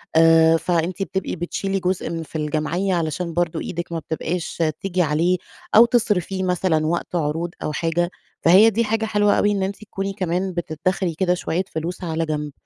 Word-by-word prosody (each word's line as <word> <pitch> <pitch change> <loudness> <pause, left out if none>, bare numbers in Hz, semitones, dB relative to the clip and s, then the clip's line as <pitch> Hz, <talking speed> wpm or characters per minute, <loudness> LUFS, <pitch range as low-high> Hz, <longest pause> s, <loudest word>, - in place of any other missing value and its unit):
آآ، 165 0 +6
فأنتِ 175 +3 -1
بتبقي 190 -1 -3
بتشيلي 195 +3 -2
جزء 185 0 -1
من 165 -1 -4
في 160 - -7
الجمعية 155 +5 -1
علشان 170 +1 -2
برضو 170 -1 0
إيدِك 170 0 -5
ما 165 - -2
بتبقاش 165 +2 -3 0.2
تيجي 185 -2 0
عليه 170 +3 +2 0.4
أو 230 +2 +9
تصرفيه 205 -6 0
مثلًا 180 -3 +1
وقت 170 +1 -2
عروض 165 +1 -1
أو - - -1
حاجة، 170 +2 0 0.3
فهي 190 +7 +7
دي 225 +2 +1
حاجة 220 +1 0
حلوة 205 -1 +2
أوي 205 - +3
إن 200 -2 0
أنتِ 195 +1 -2
تكوني 195 -1 -4
كمان 185 -1 -1
بتدخري 175 +2 -1
كده 180 +1 +2
شوية 180 0 -1
فلوس 170 +3 -4
على 165 -1 -1
جنب. 150 -1 -3
175 Hz, 175 wpm, -22 LUFS, 165-190 Hz, 0.4 s, أو